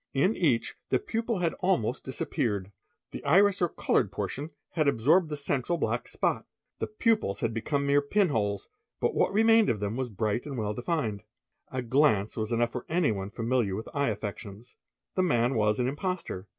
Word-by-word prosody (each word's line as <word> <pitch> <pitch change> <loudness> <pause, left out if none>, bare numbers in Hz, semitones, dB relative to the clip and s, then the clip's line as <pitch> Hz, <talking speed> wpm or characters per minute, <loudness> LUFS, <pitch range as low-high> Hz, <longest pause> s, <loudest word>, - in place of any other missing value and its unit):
In 185 +11 +3
each 135 -10 +1 0.2
the 130 - +3
pupil 225 - -2
had 170 -2 0
almosi 175 - +1
disappeared. 105 -6 -2 0.4
The - - -7
iris 200 0 +4
or 175 - +3
coloured - - +1
portion 145 +4 -4 0.2
had 155 -3 +1
absorbed 150 +7 +3
the 150 - -3
central 140 +3 -1
blac - - -1
spot. - - -1 0.3
The - - -1
pupils 225 - 0
had 115 0 0
become 140 +5 -1
mere 140 +1 +4
pinholes, 140 - 0 0.3
but - - +1
what - - +2
remained 225 +1 +5
of 110 - 0
ther 100 0 -2
was 125 +2 -3
bright 110 +4 -2
and 140 -3 -5
well 105 -2 -1
defined. 120 -4 -2 0.5
A 130 -1 -4
glance 120 -5 +2
was 110 0 -3
enough 115 0 +1
for 125 - -6
anyone 115 - 0
familié 115 -3 0
with 110 - -6
eye 140 -1 +1
affections. 105 +1 -6 0.4
he 185 - +2
man 125 -8 +2
was 105 -2 +2
an 125 - +1
imposter. 145 - -3
130 Hz, 175 wpm, -28 LUFS, 110-165 Hz, 0.5 s, remained